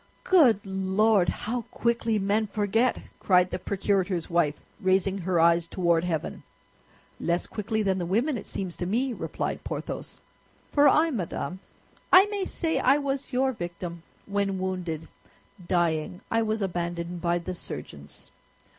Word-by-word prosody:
"Good 265 - +5
Lord, 190 0 +2
how 240 +3 -2
quickly 230 -2 0
men 205 +2 +1
forget!" 220 +4 +1 0.2
cried 180 -1 +3
the - - -3
procurator's 190 -2 -1
wife, 160 -4 +1 0.2
raising 190 0 +2
her 180 -1 0
eyes 170 0 +4
toward 170 -2 +1
heaven. 165 -4 -3 0.8
"Less 170 +1 0
quickly 220 +1 -2
than 190 -2 +1
the 175 - -2
women, 240 - +1
it 215 - -6
seems 185 -3 -4
to 175 - -3
me," 245 +6 0
replied - - -4
Porthos; - - -6 0.5
"for 290 -1 +6
I, 320 +4 +4
madame, 185 - -3 0.5
I 370 +1 +9
may 400 -2 -1
say 325 -3 -1
I 270 +3 +4
was 280 -1 -3
your 265 +1 +2
victim, 175 -4 -6 0.2
when 200 -1 -1
wounded, 180 -4 -3 0.6
dying, 175 0 0
I 225 - +3
was 220 -1 -1
abandoned 175 -1 -3
by 175 0 +1
the 175 +1 -5
surgeons. 70 - -9
190 Hz, 145 wpm, -27 LUFS, 175-225 Hz, 0.8 s, I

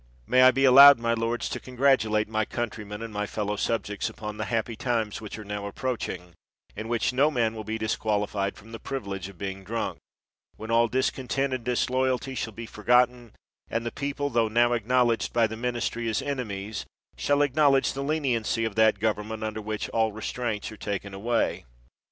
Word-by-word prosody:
May 125 - +4
I 130 - +9
be 135 +2 +2
allowed, 140 +2 +10
my 115 0 0
lords, 115 +1 -1
to - - -4
congratulate 125 -5 +2
my 110 0 0
countrymen 105 -2 -5
and 105 -2 -4
fellow 105 -1 -2
subjects 105 -1 -2
upon 105 -1 -7
the 110 - -3
happy 115 0 -2
times 115 -3 -2
which 105 0 -7
are 110 - -8
now 105 0 -4
approaching, 100 -6 -4 0.4
in 110 - -5
which 120 +2 0
no 140 +4 +4
man 115 -6 0
will 110 -1 -6
be 110 +1 -3
disqualified 105 -2 -1
from 110 +2 -14
the 115 - -7
priv 135 -4 -4
ilege 95 -2 -5
of 100 - -14
being 95 +1 -5
drunk; 115 +3 -3 0.6
when 110 +1 -7
all 115 +1 +4
discontent 130 +2 -1
and 130 -2 -3
disloyalty 130 +2 0
shall 115 -3 -3
be 115 +2 -7
forgotten, 125 +2 +1 0.4
and 115 +1 -2
the 115 - -2
people, 145 0 -3
tho 115 -1 +2
now 120 +2 +3
considered 120 0 +1
by 115 -1 +4
the 110 0 -4
ministry 120 0 -2
as 110 - 0
enemies, 110 -7 -4 0.3
shall 145 0 +2
acknowledge 140 -1 +3
the 135 - -4
leniency 130 -6 0
of 110 - -3
that 110 -1 +4
govern 105 0 0
ment 110 0 -5
under 110 0 -3
which 105 0 -3
all 110 -1 +1
restraints 110 0 -4
are 110 - -10
taken 100 -1 -4
away 115 +4 -1
115 Hz, 185 wpm, -26 LUFS, 105-125 Hz, 0.6 s, allowed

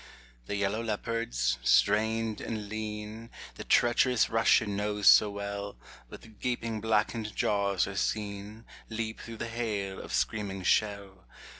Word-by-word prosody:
The - - -2
yellow 100 +2 0
leopards, 105 - -1
strained 110 - +2
and 110 -2 -4
lean, 110 +1 -6 0.2
The - - -8
treacherous 120 0 +3
Russian 115 -2 +3
knows 105 0 -2
so 105 - +8
well, 100 -3 -5 0.3
With 110 -2 -13
gaping 115 -3 -2
blackened 110 0 0
jaws 100 -3 +1
are 100 - -6
seen 105 +1 -3 0.2
Leap 110 0 -4
through 115 -1 -8
the 120 - -4
hail 105 -5 -3
of - - -9
screaming 100 -3 -1
shell. 100 -1 0
105 Hz, 130 wpm, -29 LUFS, 100-115 Hz, 0.3 s, so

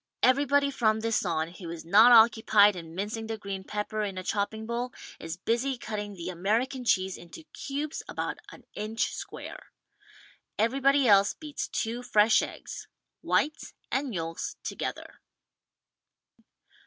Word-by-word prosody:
Everybody 280 +2 +4
from 220 -4 +1
this 225 0 +1
on 165 -3 -1
who 175 0 -9
is 165 -1 -7
not 215 +8 +7
occupied 220 -3 +6
in 165 -2 -9
mincing 215 +4 -4
the 225 0 -3
green 195 -2 -6
pepper 210 +2 -3
in 200 -3 -3
a 185 - -4
chopping 220 +3 -2
bowl 240 +2 -3 0.3
is 165 +1 -6
busy 240 +7 -1
cutting 210 -3 -5
the 175 0 -6
American 225 +9 -1
cheese 190 -4 +1
into 175 - -12
cubes 285 +2 -4
about - - -4
an - - -14
inch 220 +2 -2
square. - - -8 0.9
Everybody 270 +4 +3
else 200 -1 +5
beats 300 -3 -5
two 235 +2 -3
fresh 220 -2 +4
eggs - - -7 0.2
— - - -58
whites 300 +1 -1 0.2
and 265 -1 -1
yolks 165 -4 -4
together. - - -5
220 Hz, 140 wpm, -28 LUFS, 195-245 Hz, 0.9 s, not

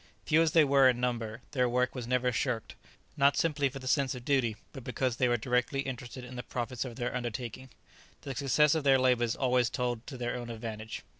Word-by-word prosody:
Few 160 +1 +4
as 165 -2 +2
they 160 - +7
were 135 -2 +5
in 125 -1 0
number, 120 -2 -2
their 125 -4 +1
work 125 +1 +1
was 125 -3 -5
never 125 0 +1
shirked, 120 -1 -2 0.4
not 140 0 +4
simply 145 -4 +1
from 135 +1 -9
the 130 - -7
sense 135 -1 +1
of 125 -1 -9
duty, 130 -6 +2 0.2
but 135 -4 -8
because 125 -1 -1
they 130 - +3
were 120 0 +2
directly 125 +4 0
interested 130 -1 -6
in 125 +1 -9
the 125 - -4
profits 120 -1 -4
of 125 -3 -7
their 120 0 -3
undertaking; 125 +1 -5 0.5
the 135 - -5
success 140 +3 +3
of 160 -2 0
their 135 -1 +5
labours 125 -3 +2
always 125 -2 +2
told 120 -3 -3
to 130 - -7
their 120 0 -2
own 120 -1 -6
advantage. 110 -1 -6
125 Hz, 220 wpm, -30 LUFS, 120-135 Hz, 0.5 s, they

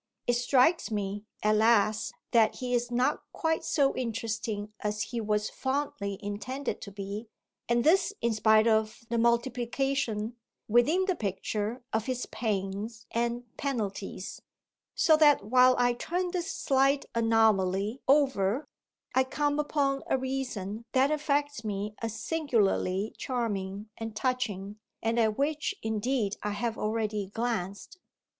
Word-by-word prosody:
It 245 - +2
strikes 255 +7 +3
me, 205 -1 -3 0.2
alas, 215 0 +3 0.2
that 225 -2 +4
he 250 -1 -3
is 240 0 +1
not 245 +1 +1
quite 320 -1 0
so 280 -3 +2
interesting 220 -3 -3
as 210 0 -1
he 235 -2 -4
was 210 -1 0
fondly 265 -7 -2
intended 250 +7 -4
to 200 - -8
be, 200 +3 -6 0.4
and 235 0 +3
this 370 +6 +4
in 235 -1 +1
spite 215 0 +4
of 220 0 +1
the 235 - +1
multiplication, 235 -1 0 0.3
within 285 - +4
the 375 -2 +1
picture, 210 - -3
of 220 +1 0
his 255 -1 -2
pains 215 +1 -3
and 235 +1 -1
penalties; 205 -8 -4 0.5
so 315 - +5
that 295 -8 +5
while 255 +3 +6
I 245 0 +3
turn 355 +8 -2
this 360 +1 -2
slight 275 -4 +2
anomaly 220 -1 +2
over 265 -4 +3 0.5
I 260 - +4
come 290 +2 0
upon 280 -2 +1
a - - +2
reason 250 -6 -3
that 270 +2 +4
affects 290 -4 0
me 210 0 -3
as 225 -1 -4
singularly 220 - 0
charming 210 -4 -3
and 225 -1 -6
touching 215 -4 -2 0.2
and 225 +1 +1
at 220 -2 +2
which 295 +2 0
indeed 220 -1 0
I 210 - -2
have 230 +2 -2
already 215 -2 -1
glanced. 220 - -3
230 Hz, 135 wpm, -29 LUFS, 210-265 Hz, 0.5 s, while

